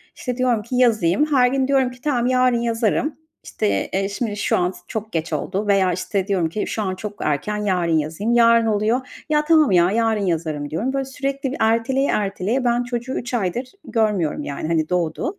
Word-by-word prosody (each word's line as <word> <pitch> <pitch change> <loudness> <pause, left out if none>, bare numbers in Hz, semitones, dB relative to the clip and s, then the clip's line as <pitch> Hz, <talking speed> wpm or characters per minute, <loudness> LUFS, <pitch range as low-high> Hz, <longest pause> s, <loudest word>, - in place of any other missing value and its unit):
İşte, 250 -2 -4
diyorum 250 -4 +1
ki 235 +4 -5
yazayım. 220 - +3
Her 270 -5 +3
gün 265 +1 0
diyorum 265 -2 +2
ki: 250 0 -15
"Tamam, 250 -5 0
yarın 255 -1 +3
yazarım, 235 +5 0 0.3
işte, 100 -1 -1
eee, 195 +1 0
şimdi 210 0 -3
şu - - +1
an 180 0 +1
s - - -14
çok 220 0 -5
geç 165 0 -3
oldu." 200 +2 -2
veya, 195 -3 +3
işte, 185 +2 -2
diyorum 185 -5 +1
ki: 210 +6 -3
"Şu 220 - -3
an 190 -3 -2
çok 210 +2 -6
erken, 155 +8 -1
yarın 180 -6 +1
yazayım." 160 +10 -1
Yarın 230 -1 +5
oluyor, 220 +4 -1
"Ya, 300 0 +2
tamam 310 -4 +4
ya, 175 0 +4
yarın 225 -1 +1
yazarım." 155 -4 -2
diyorum. 220 - -2
Böyle, 275 0 -1
sürekli 275 0 -3
bir 280 - -4
erteleye 230 +5 +2
erteleye 205 +5 -1
ben 240 0 +2
çocuğu 245 +1 -4
3 240 - -4
aydır 235 +3 -1 0.2
görmüyorum, 210 - 0
yani, 145 +2 -4
hani, 160 -1 0
doğdu. 180 - -1
220 Hz, 200 wpm, -21 LUFS, 185-250 Hz, 0.3 s, Yarın